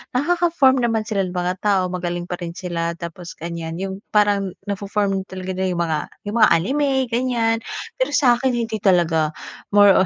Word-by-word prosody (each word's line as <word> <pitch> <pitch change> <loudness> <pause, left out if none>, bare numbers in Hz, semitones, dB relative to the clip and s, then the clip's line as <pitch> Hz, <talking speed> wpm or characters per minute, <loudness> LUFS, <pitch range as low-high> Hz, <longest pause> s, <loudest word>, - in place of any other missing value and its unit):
nakaka-form 320 -2 +3
naman 225 -2 +1
sila 200 -3 +1
ng 180 - -6
mga 180 0 0
tao 195 -3 +2
magaling 175 -1 -3
pa 175 - -3
rin 170 -1 -5
sila 170 -2 -2
tapos 170 +1 -7
ganyan 165 -1 -5
yung 190 0 -3 0.2
parang 205 -3 +2 0.2
nafo-form 200 -1 -1
talaga 185 0 -5
nila 190 0 0
yung 170 - -1
mga 155 -2 0 0.3
yung 210 - -4
mga - - +7
anime 270 - +1 0.2
ganyan. 235 -2 +1 0.4
Pero - - 0
sa'kin 250 -1 +3
hindi 225 -2 -2
talaga. 165 -5 +3 0.4
More 205 -1 +8
195 Hz, 165 wpm, -21 LUFS, 175-230 Hz, 0.4 s, More